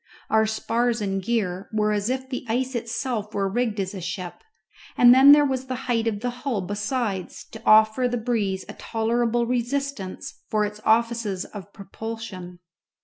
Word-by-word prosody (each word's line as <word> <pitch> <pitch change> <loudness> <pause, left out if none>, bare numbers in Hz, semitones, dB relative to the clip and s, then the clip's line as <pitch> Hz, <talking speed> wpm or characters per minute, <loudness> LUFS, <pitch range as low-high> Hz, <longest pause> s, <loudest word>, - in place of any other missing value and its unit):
Our 220 0 +4
spars 235 +2 0
and 195 -2 -2
gear 195 -4 -2
were 215 -1 +1
as 210 +1 0
if 260 0 -2
the 255 -1 -5
ice 255 +3 0
itself 230 -2 -3
were 200 -1 +1
rigged 220 +1 -1
as 190 0 -2
a 190 - -6
ship, 180 - -6 0.5
and 245 0 +8
then 270 +2 +8
there 295 0 +7
was 265 -1 -2
the 255 - -3
height 230 -2 0
of 210 -2 -2
the 245 0 -1
hull 250 -8 -1
besides 205 0 -3
to 220 - -10
offer 220 +3 +5
to - - +2
the 245 - -1
breeze 215 -5 -1
a - - -8
tolerable 235 +1 0
resistance 245 -3 -3
for 215 -1 +1
its 210 +1 -7
offices 225 -4 +1
of 200 -1 -10
propulsion. 200 -3 -8
225 Hz, 175 wpm, -24 LUFS, 205-245 Hz, 0.5 s, and